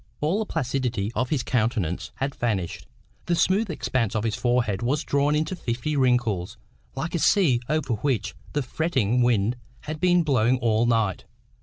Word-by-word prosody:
All 160 +8 +1
the 220 - -2
placidity 125 -8 -1
of 125 +1 -1
his 145 -5 0
countenance 110 -8 -1
had 135 +1 -2
vanished. 100 -10 -2 0.4
The 175 - +2
smooth 195 +5 +2
expanse 125 - -1
of 110 - 0
his 110 -2 0
forehead 120 -3 0
was 140 +6 0
drawn 145 +1 +1
into 155 +4 -1
fifty 125 0 -3
wrinkles, 120 -10 +1 0.4
like 160 +5 -3
a 170 - 0
sea 155 - +4
over 155 -5 0
which 110 -2 -1 0.2
the 145 - 0
fretting 125 -5 0
wind 120 -1 +2 0.2
has 155 +1 -5
been 175 +1 +3
blowing 130 -4 +2
all 115 -1 +2
night. 110 -5 +1
125 Hz, 165 wpm, -25 LUFS, 115-150 Hz, 0.4 s, sea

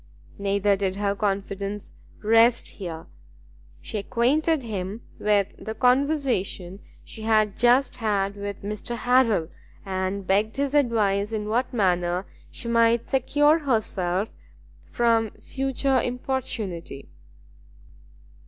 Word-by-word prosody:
Neither 200 0 +2
did 190 -1 -1
her 200 0 0
confidence 200 0 -3 0.3
rest 230 +2 +4
here; 165 -5 -7 0.8
she 215 - -4
acquainted 270 +7 +1
him 205 0 -5 0.2
with 205 -2 +2
the 220 - -5
conversation 250 - +1 0.3
she 220 - -10
had 215 -2 +2
just 245 +3 +3
had 200 -4 0
with 200 -1 -6
Mr 210 +3 -4
Harrel, 230 -9 +3 0.4
and 190 0 -2
begged 210 +5 +1
his 280 0 0
advice 215 -7 +2
in 210 -1 -3
what 245 +4 0
manner 180 -4 +1 0.2
she 235 - -8
might 230 0 +2
secure 290 +4 +3
herself 210 - -1 0.6
from 230 -2 +2
further 270 -1 0
importunity. 230 - -4
215 Hz, 105 wpm, -25 LUFS, 195-245 Hz, 0.8 s, rest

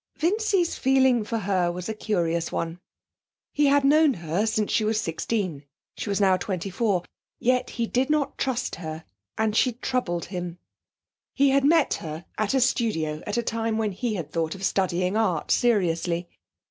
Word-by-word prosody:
Vincy's 385 0 +1
feeling 265 -3 +4
for 230 +2 -3
her 185 -4 +1
was 180 +1 -6
a 220 - -2
curious 170 -6 -1
one. 165 +1 -3 0.7
He 295 -1 +3
had 280 0 +4
known 300 0 +5
her 170 +5 -1
since 215 -1 0
she 220 - +2
was 215 0 +1
sixteen 175 -4 -2 0.3
(she - - -5
was 200 - 0
now 190 -2 +4
twenty 190 0 -4
four). 195 -3 0 0.3
Yet 250 +1 +1
he 235 - +1
did 255 +4 0
not 300 -2 +1
trust 255 -2 -2
her, 160 -1 -7 0.3
and 220 -1 +1
she 250 +2 +3
troubled 240 -8 -2
him. 175 -1 -4 0.8
He 275 0 +4
had 275 0 +3
met 315 +1 +4
her 160 +1 -6
at 215 +4 +1
a 265 - +3
studio 160 -12 0
at 210 - -2
a 235 - +1
time 225 -1 -1
when 220 -2 0
he 220 +3 -2
had 160 -5 -5
thought 165 0 -1
of 195 - -9
studying 185 0 0
art 215 -6 0
seriously. 175 -6 +1
215 Hz, 175 wpm, -25 LUFS, 175-250 Hz, 0.8 s, known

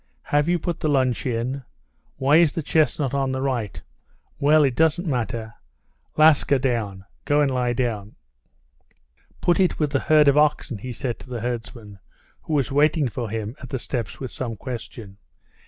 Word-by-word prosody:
"Have 145 +2 +1
you 175 - +3
put 170 0 -3
the - - -1
lunch 130 -3 +1
in? 125 +3 -2 0.6
Why 140 +3 +4
is 165 -3 +4
the 165 - -3
chestnut 150 -3 +1
on 135 -1 0
the 130 - -2
right? 125 -6 -2 0.6
Well, 150 +2 +5
it 135 -3 +1
doesn't 160 +2 +2
matter. 115 -4 -2 0.6
Laska, 155 -2 +5
down; 110 -7 -2 0.2
go 145 0 +2
and 140 -2 +2
lie 125 -1 0
down!" 115 -5 -3 1.3
"Put 175 +1 +2
it 185 -2 +2
with 150 -3 0
the 140 - +1
herd 150 0 +4
of 140 +1 +5
oxen," 150 -6 +1
he 125 +5 -6
said 120 0 -4
to - - -13
the 120 -3 -4
herdsman, 115 -3 -6 0.4
who 160 - -5
was 140 -2 +1
waiting 145 0 +3
for 120 -1 -4
him 110 +2 -4
at 130 - -9
the 130 - -2
steps 120 -4 -4
with 130 -3 -6
some 120 -3 -4
question. 115 -4 -8
130 Hz, 175 wpm, -23 LUFS, 120-150 Hz, 1.3 s, Well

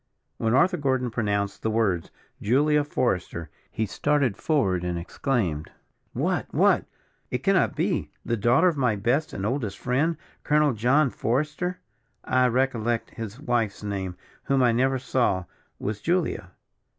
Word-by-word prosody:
When 115 +2 +1
Arthur 180 +6 +4
Gordon 130 -4 0
pronounced 100 -3 -1
the 110 - 0
words, 105 -7 0 0.3
Julia 145 +7 +3
Forester, 90 - -2 0.2
he 110 - -2
started 140 0 +1
forward, 100 - +1
and 90 -1 -2
exclaimed: 85 - -2 0.4
"What - - -1
what! - - +3 0.4
it - - -3
cannot - - +3
be - - 0 0.2
the 120 - 0
daughter 120 - +4
of 170 - +2
my 125 -5 +2
best 120 +10 0
and 95 - -4
oldest 110 -4 -2
friend, 140 +6 0 0.3
Colonel 150 -2 +3
John 125 +5 +3
Forester? 150 - -1 0.4
I 130 0 +3
recollect 120 -2 0
his 115 +1 -7
wife's 120 -8 -1
name, 95 -3 -3 0.3
whom 135 -1 +2
I 120 - +5
never 130 +3 +2
saw, 120 -7 0 0.3
was 105 0 -4
Julia." 165 - 0
120 Hz, 140 wpm, -25 LUFS, 105-140 Hz, 0.4 s, I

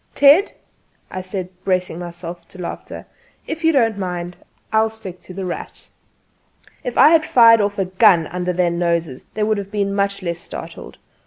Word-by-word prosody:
"Ted," 290 +8 +6 0.6
I 185 - -4
said, 185 -1 -5
bracing 180 -3 -1
myself 175 0 -8
for - - -14
the 180 - -6
laughter, - - -7 0.4
"if 325 +1 -5
you 325 - +5
don't 225 -8 +2
mind, 180 -1 -4 0.4
I'll 220 0 +3
stick 195 -5 -8
to 185 - -12
'The 190 -1 -4
Rat.'" 175 - -7 0.9
If 250 -3 -4
I - - +8
had 320 -1 +5
fired 230 -5 +6
off 205 +1 -1
a 195 - 0
gun 185 -2 +4
under 180 +2 -3
their 180 -1 +1
noses 170 -5 -1
they 215 - 0
would 215 -1 +1
have 200 -1 -7
been 200 -1 -1
much 200 -1 -1
less 170 -1 -3
startled. - - -9
190 Hz, 180 wpm, -20 LUFS, 175-220 Hz, 0.9 s, I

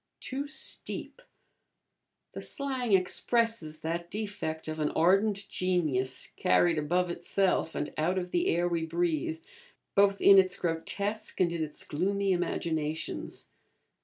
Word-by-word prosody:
'Too 275 +2 -4
steep:' 310 +10 -5 1.1
the - - -7
slang 260 -5 -2
expresses 190 -3 +1
that 170 +1 -3
defect 200 -7 -4
of 155 0 -4
an 150 -1 +1
ardent 195 +3 +3
genius, 150 -10 0
carried 175 -3 +3
above 175 +4 +1
itself, 175 0 0
and 145 - -3
out 175 +5 +1
of 180 -1 -3
the 175 - +1
air 175 +1 +2
we 170 -2 -1
breathe, 160 -1 -1 0.5
both 200 0 +4
in 195 -1 +8
its 185 -1 +2
grotesque 200 +6 -2
and 175 -2 +3
in 165 -2 -1
its 150 -1 -5
gloomy 195 +5 0
imaginations. 160 -3 -2
175 Hz, 130 wpm, -29 LUFS, 160-200 Hz, 1.1 s, in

